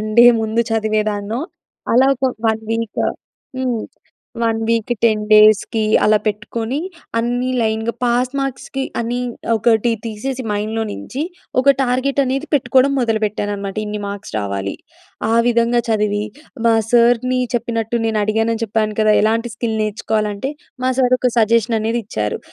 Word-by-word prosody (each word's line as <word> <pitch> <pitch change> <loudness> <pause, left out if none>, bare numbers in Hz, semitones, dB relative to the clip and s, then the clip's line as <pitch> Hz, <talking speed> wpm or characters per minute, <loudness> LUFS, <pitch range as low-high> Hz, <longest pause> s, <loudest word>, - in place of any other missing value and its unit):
1 215 - -3
day 240 - +9
ముందు 220 +1 +1
చదివేదాన్నో, 215 0 -1 0.5
అలా 265 +2 +5
ఒక 265 - -3 0.2
1 220 0 0
వీక్ 225 -2 -2 0.6
హ్మ్. 250 -3 -1 0.6
1 225 -1 +1
వీక్‌కి, 230 +1 +1
10 215 -2 +3
డేస్‌కి 215 +1 +5 0.2
అలా 215 - +5
పెట్టుకొనీ 225 +5 -2 0.4
అన్నీ 245 +2 0
లైన్‌గా, 220 +1 0
పాస్ 245 +2 +1
మార్క్స్‌కి 270 0 -4 0.2
అని 235 +1 -2 0.4
ఒకటి 225 +1 +2 0.2
తీసేసి 250 +4 -4
మైండ్‌లో 215 +2 -1
నించి 265 +7 -5 0.4
ఒక 275 +1 +5
టార్గెట్ 265 +2 +1
అనేది 270 +4 -2
పెట్టుకోడం 260 0 +3
మొదలు 225 -3 +1
పెట్టాననమాట. 205 -1 -3
ఇన్ని 210 0 -4
మార్క్స్ 200 - -7
రావాలి. 100 -1 -3 0.6
ఆ - - +3
విధంగా 235 0 +3
చదివీ, 210 -1 +1 0.4
మా 230 - +5 0.2
సర్‌ని 245 +1 +3 0.2
చెప్పినట్టు, 230 -1 -1
నేను 220 -1 0
అడిగానని 225 +1 0
చెప్పాను 215 -1 -1
కదా! 215 -1 +4
ఎలాంటి 230 +2 +1
స్కిల్ 225 -1 -2
నేర్చుకోవాలంటే, 215 +2 -2 0.3
మా 260 - +3
సర్ 255 -1 +4
ఒక 250 0 +1
సజెషన్ 230 0 +3
అనేది 225 +2 0
ఇచ్చారు. 105 - -2
225 Hz, 140 wpm, -18 LUFS, 215-245 Hz, 0.6 s, day